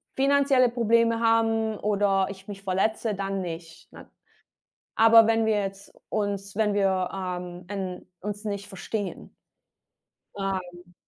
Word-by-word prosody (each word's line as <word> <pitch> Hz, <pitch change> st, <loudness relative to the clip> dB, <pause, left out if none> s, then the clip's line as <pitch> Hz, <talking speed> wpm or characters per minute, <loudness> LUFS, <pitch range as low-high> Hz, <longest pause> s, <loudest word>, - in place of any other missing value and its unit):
finanzielle 275 Hz, -2 st, +4 dB
Probleme 230 Hz, -1 st, +2 dB
haben 225 Hz, -1 st, +2 dB
oder 200 Hz, -2 st, +1 dB
ich 195 Hz, 0 st, -10 dB
mich 200 Hz, -1 st, -8 dB
verletze, 210 Hz, +3 st, 0 dB
dann 195 Hz, 0 st, -3 dB
nicht, 165 Hz, -2 st, -8 dB
ne? -, -, -13 dB, 0.9 s
Aber 225 Hz, 0 st, +7 dB
wenn 225 Hz, 0 st, +2 dB
wir 215 Hz, -2 st, +2 dB
jetzt 195 Hz, 0 st, -6 dB, 0.2 s
uns 200 Hz, -2 st, -2 dB
wenn 210 Hz, -2 st, +2 dB
wir, 190 Hz, -2 st, +1 dB
ähm, 180 Hz, -2 st, -5 dB
äh, 190 Hz, -3 st, -4 dB, 0.2 s
uns 205 Hz, +2 st, -5 dB
nicht 200 Hz, -1 st, -4 dB
verstehen. 200 Hz, +1 st, -5 dB, 1.0 s
Ähm. 180 Hz, -2 st, -5 dB
200 Hz, 125 wpm, -26 LUFS, 190-225 Hz, 1.0 s, Aber